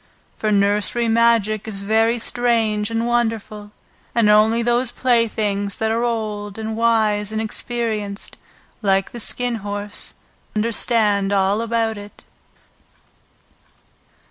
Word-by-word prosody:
For 215 - -1
nursery 205 +3 +1
magic 225 -2 +2
is 200 -2 -3
very 225 +3 +2
strange 225 -3 +1
and 230 0 -1
wonderful, 225 -3 -2 0.4
and 230 -3 +4
only 220 +2 +4
those 240 +1 +1
playthings 220 -5 0
that 220 0 0
are 230 +1 0
old 215 -3 -3
and 220 0 -4
wise 215 -2 +1
and 220 - -2
experienced 220 -2 -3 0.5
like 195 -2 +1
the 240 - -7
Skin 245 +1 -1
Horse 205 0 -4 0.4
understand 215 -2 +2
all 200 +2 +2
about 230 -2 -1
it. 205 0 -12
220 Hz, 115 wpm, -20 LUFS, 205-230 Hz, 0.5 s, and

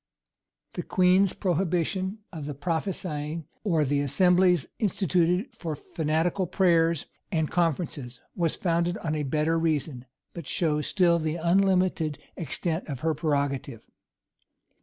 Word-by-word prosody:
The - - -3
queen's 185 +1 +3
prohibition 185 +2 -1
of 155 -4 -6
the 145 - -5
"prophesyings," 160 -1 -3 0.2
or 165 -7 +2
the 140 +1 +1
assemblies 180 +3 +3
instituted 185 - +1
for 165 -8 -4
fanatical 160 +5 -1
prayers 170 -4 +2 0.3
and 160 -4 0
conferences, 150 -7 -1 0.2
was 170 -3 0
founded 170 0 0
on 155 -2 -3
a 155 - -1
better 155 +3 +1
reason, 150 -5 -1 0.3
but 170 -4 -8
shows 150 -3 0
still 175 -3 +3
the 155 0 -1
unlimited 180 -3 +2 0.2
extent 165 +1 -3
of 135 -4 -5
her 160 0 +1
prerogative. 140 -6 -2
165 Hz, 120 wpm, -27 LUFS, 150-180 Hz, 0.3 s, queen's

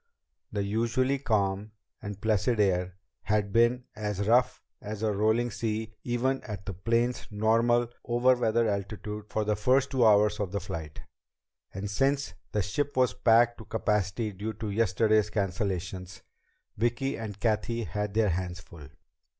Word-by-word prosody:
The 100 -2 -1
usually 115 +6 0
calm 105 -4 0 0.3
and 105 -1 -6
placid 110 +2 +1
air 90 -2 +1 0.3
had 105 -1 0
been 120 +2 +3
as 105 -1 -2
rough 125 +2 +3 0.2
as 105 +1 -6
a 110 - +2
rolling 110 +4 +1
sea 110 -1 -3
even 130 +2 0
at 100 -4 -7
the 100 - -4
plane's 115 +6 0
normal 115 +3 +2 0.2
"over 120 +2 +3
weather" 115 -1 +1
altitude 105 +1 -4
for 110 - -1
the 105 0 +1
first 130 +6 +2
two 130 -3 +2
hours 105 -1 +5
of 100 -3 -2
the 100 - 0
flight; 80 -4 -7 0.7
and 95 +2 -5
since 135 +7 0 0.2
the 105 - 0
ship 140 +9 -2
was 130 -1 +3
packed 120 +1 +4
to 110 - -10
capacity 105 0 -1
due 105 +3 -5
to 105 0 -5
yesterday's 110 0 +2
cancellations, 95 -2 -3 0.5
Vicki 120 +5 0
and 105 -3 -6
Cathy 115 +1 0
had 105 -1 -3
their 110 -2 +3
hands 90 0 -2
full. 80 -4 -13
105 Hz, 150 wpm, -28 LUFS, 100-120 Hz, 0.7 s, hours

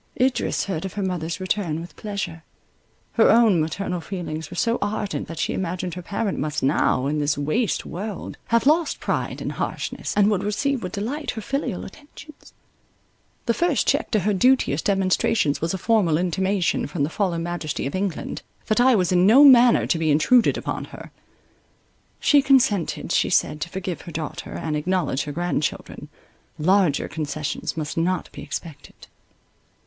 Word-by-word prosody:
Idris 255 +1 +1
heard 170 -5 -3
of 190 - -5
her 205 - -3
mother's 170 -2 -3
return 185 -4 -1
with 170 +1 -10
pleasure. 195 -6 -5 0.7
Her 225 - +4
own 220 -7 +5
maternal 180 +2 -3
feelings 160 -5 -5
were 180 - -9
so 230 +4 +1
ardent, 205 -1 -2
that 165 - -8
she - - -1
imagined 180 -1 -3
her 180 - -6
parent 200 +3 -2
must 150 -1 -2
now, 135 -1 +2
in 150 +2 0
this 145 0 0
waste 155 - 0
world, 200 +2 -6
have 230 +2 +1
lost 315 +3 +2
pride - - -2
and - - -3
harshness, - - -4
and 205 +1 +5
would 195 -3 +1
receive 250 +6 -1
with 180 -1 -6
delight 265 +9 -3
her 220 - -3
filial 270 -7 -3
attentions. 300 +6 -14 0.9
The 235 - +2
first 340 +1 +1
check - - +1
to 215 -4 +1
her 210 +3 +1
duteous 225 - +3
demonstrations 190 -4 +1
was 165 +1 0
a 190 - -2
formal 190 -6 +2
intimation 185 +1 0
from 145 0 -2
the 145 - 0
fallen 175 -4 -1
majesty 175 -5 -3
of 140 - -3
England, 190 -3 -3 0.2
that 220 +2 +2
I 255 0 +5
was 185 -4 +1
in 180 +1 +4
no 255 +7 +8
manner 245 -3 +7
to 165 - 0
be 160 -1 +1
intruded 220 +11 +4
upon - - -4
her. - - -12 1.1
She 290 -1 +5
consented, 240 - +2
she - - +2
said, 150 - +1
to 165 - -3
forgive 185 -1 -5
her 170 - -9
daughter, 155 -1 -6
and 155 -2 -3
acknowledge 150 -3 -1
her 145 - -5
grandchildren; 170 -1 -3 0.5
larger 180 -2 +2
concessions 155 +1 -4
must 155 0 -4
not 180 +2 -1
be - - -9
expected. 160 -4 -8
185 Hz, 170 wpm, -23 LUFS, 160-220 Hz, 1.1 s, no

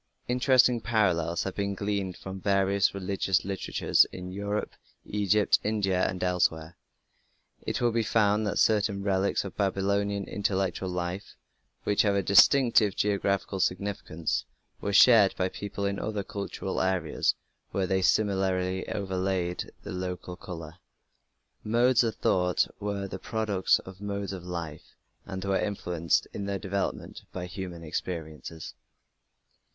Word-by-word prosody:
Interesting 125 -1 +4
parallels 90 -8 +1
have 95 - -4
been 100 -1 -2
gleaned 100 -2 -2
from 95 0 -8
various 100 0 +2
religious 95 -1 0
literatures 95 -1 +2
in 90 0 -8
Europe, 100 +2 -3 0.3
Egypt, 105 0 +2
India, 100 -4 +1
and 90 - -4
elsewhere. 85 -3 0 0.9
It - - -1
will 120 -1 +3
be 115 0 +1
found 105 -1 +2
that - - -1
certain 105 -2 +2
relics 100 0 +1
of 100 - -7
Babylonian 100 0 0
intellectual 95 -2 -1
life, 90 +2 -4 0.5
which 105 - +2
have 100 -2 +2
a 100 - +1
distinctive 110 0 +5
geographical 100 -1 0
significance, 90 -4 -1 0.3
were 100 - -2
shared 105 -1 +7
by 95 0 +1
peoples 100 +1 -3
in 100 - -3
other 105 -2 -3
cultural 100 -1 -4
areas 95 -4 +1 0.3
where 95 - -1
they 95 +1 +1
were - - -2
similarly 95 -2 +1
overlaid 95 -2 -2
with - - -6
local 90 -1 -5
colour. 85 -2 -9 0.8
Modes 120 +3 +3
of 115 -2 -1
thought 90 -1 +2
were 100 -1 -3
the 95 0 -7
products 105 -3 +1
of 95 +1 -12
modes 100 -1 -3
of 90 -2 -7
life 85 -4 -7 0.3
and 95 -1 -5
were 95 0 +1
influenced 90 -5 0
in 100 - -4
their 100 0 -1
development 100 0 -3
by 90 -1 -5
human 90 -2 -7
experiences. 80 -1 -5
95 Hz, 135 wpm, -28 LUFS, 90-100 Hz, 0.9 s, shared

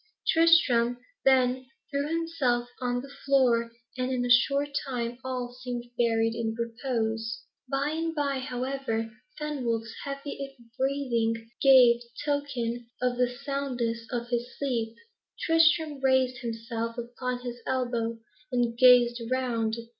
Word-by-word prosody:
Tristram 275 -8 +4 0.3
then 255 -1 +3 0.2
threw 280 0 0
himself 310 -7 0
on 245 -1 -1
the 275 0 -11
floor, 245 -4 +3 0.3
and 255 +1 0
in 250 -1 0
a 245 - 0
short 275 +4 +4 0.2
time 240 -2 -3
all 250 -2 -4
seemed 245 -1 -6
buried 225 -1 +2
in 225 -1 -2
repose. 230 -1 -2 0.3
By 275 +2 0
and 325 +1 -2
by, 280 -2 0
however, 260 -1 -2
when 225 -1 -7 0.2
Fenwolf's 240 -7 -2
heavy 275 -1 -6 0.2
breathing 240 -4 0
gave 250 -3 +7 0.2
token 245 -5 -2
of 250 -1 0
the 250 0 +3
soundness 245 -3 -3
of 240 -1 -3
his 240 +1 -3
sleep, 230 -5 -2 0.4
Tristram 320 -3 +3
raised 260 -2 +3
himself 230 0 -4
upon 245 +1 -4
his 240 -1 -6
elbow, 240 -3 -1 0.3
and 240 -2 +1
gazed 245 -1 +6
round. 235 -4 0
245 Hz, 125 wpm, -28 LUFS, 235-275 Hz, 0.4 s, gave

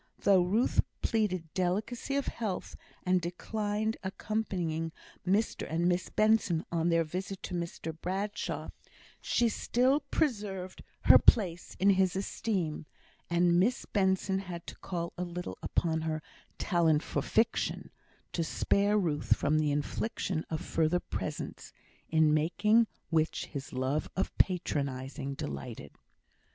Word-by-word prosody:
Though 195 -2 +5
Ruth 205 +8 +3 0.2
pleaded 185 -8 0
delicacy 210 +9 -1
of 280 - +1
health, 210 -6 -3 0.3
and 185 0 +3
declined 210 +5 -2
accompanying 185 -5 -2 0.4
Mr 200 -1 +1
and 170 +2 +2
Miss 180 0 +1
Benson 215 -6 +2
on 170 0 +1
their 165 0 +3
visit 185 +4 -5
to - - -5
Mr 170 -2 -4
Bradshaw, 195 +3 -3 0.5
she 240 - +2
still 255 +5 +2
preserved 205 - -2 0.2
her - - +8
place 175 -7 +3
in 200 +2 +6
his 190 -1 +3
esteem; 190 -5 -2 0.4
and 175 0 +4
Miss 235 +7 +2
Benson 190 -1 +1
had 175 -3 -7
to - - -8
call 170 -2 -4
a - - 0
little 180 0 -5
upon 160 -2 0
her 155 -1 -2 0.3
"talent 165 -5 +2
for 145 - -1
fiction" 225 - 0 0.4
to 170 - 0
spare 200 +5 +2
Ruth 155 -7 +2
from 150 +2 +2
the 150 -1 +2
infliction 155 +3 -2
of 160 -1 -2
further 165 +2 +1
presents, - - -5 0.4
in 160 -1 +4
making 210 +9 +3 0.2
which 160 0 +1
his 140 -2 -7
love 130 +4 -1
of - - -1
patronising 140 -6 0
delighted. 70 - -6
180 Hz, 130 wpm, -31 LUFS, 160-205 Hz, 0.5 s, her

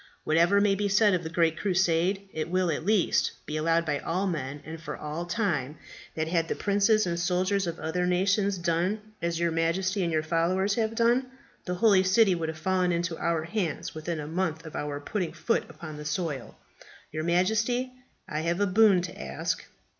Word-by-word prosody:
Whatever 170 +6 +4
may 200 -1 +3
be 205 +1 0
said 205 +1 +4
of 180 - +1
the 160 - -4
Great 165 -1 +1
Crusade, 190 0 +1
it 160 +1 -3
will, 180 -1 +1
at 155 - -3
least, 205 -1 +2
be 150 - -5
allowed 165 +2 +2
by 145 -2 -1
all 185 +4 -1
men, 145 -6 -3
and 160 0 -8
for 150 -2 -6
all 155 +3 -5
time, 160 - -1 0.4
that 160 0 -1
had 165 -1 +1
the - - -2
princes 205 +1 +2
and 170 -1 -2
soldiers 185 +2 +1
of 170 0 -3
other 180 +3 -1
nations 195 +2 +2
done 175 +4 0 0.2
as 170 -1 -1
your 170 -1 +1
Majesty 185 +5 0
and 170 -2 0
your 155 -1 +1
followers 175 +5 +1
have 225 0 -1
done, 240 +3 +3 0.4
the 180 - -2
holy 195 0 +5
city 190 +2 +4
would 165 -2 -2
have 160 - -5
fallen 185 +1 +1
into 170 -1 -1
our 165 -2 0
hands 170 -3 -3
within 160 +1 -4
a 150 - -5
month 165 0 -2
of 160 - -9
our 145 -1 -3
putting 180 +3 -3
foot 230 - -1
upon 155 -3 -9
the 150 - -8
soil. 150 -5 -3 0.5
Your 155 +1 -3
Majesty, 220 +9 +1 0.4
I 150 - -3
have 170 +3 -1
a 205 - +3
boon 195 -2 +4
to 180 - -7
ask." 65 0 -3
175 Hz, 200 wpm, -27 LUFS, 160-195 Hz, 0.5 s, holy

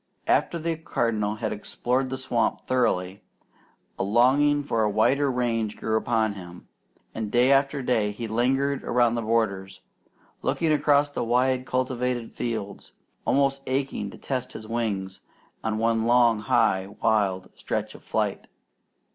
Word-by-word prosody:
After 170 - +2
the 165 0 -2
Cardinal 110 -9 -1
had 110 - -3
explored 125 +5 -2
the 130 - -3
swamp 130 -3 -1
thoroughly, 100 -7 0 0.8
a - - +1
longing 135 +8 +3
for 115 -5 0
a 105 - +2
wider 135 +7 +2
range 115 -4 -1
grew 110 - -1
upon 110 -1 +1
him; 90 -3 -11 0.5
and 110 -2 -4
day 120 +4 +4
after 140 0 +2
day 110 -5 +1
he 115 +3 -6
lingered 135 +5 0
around 120 -1 +2
the 120 - -1
borders, 100 -4 -1 0.6
looking 165 -2 0
across 145 0 +3
the - - -2
wide 125 +2 +1
cultivated 125 -2 -1
fields, 110 -4 -5 0.3
almost 135 0 +2
aching 130 -6 -2
to - - -11
test 130 -2 -4
his 110 - -9
wings 105 -5 -3 0.4
in 110 -1 -1
one 115 0 +1
long, 120 -2 +4
high, 95 -2 +2
wild 95 -4 +1
stretch - - -4
of - - -13
flight. - - -2
120 Hz, 145 wpm, -25 LUFS, 110-130 Hz, 0.8 s, day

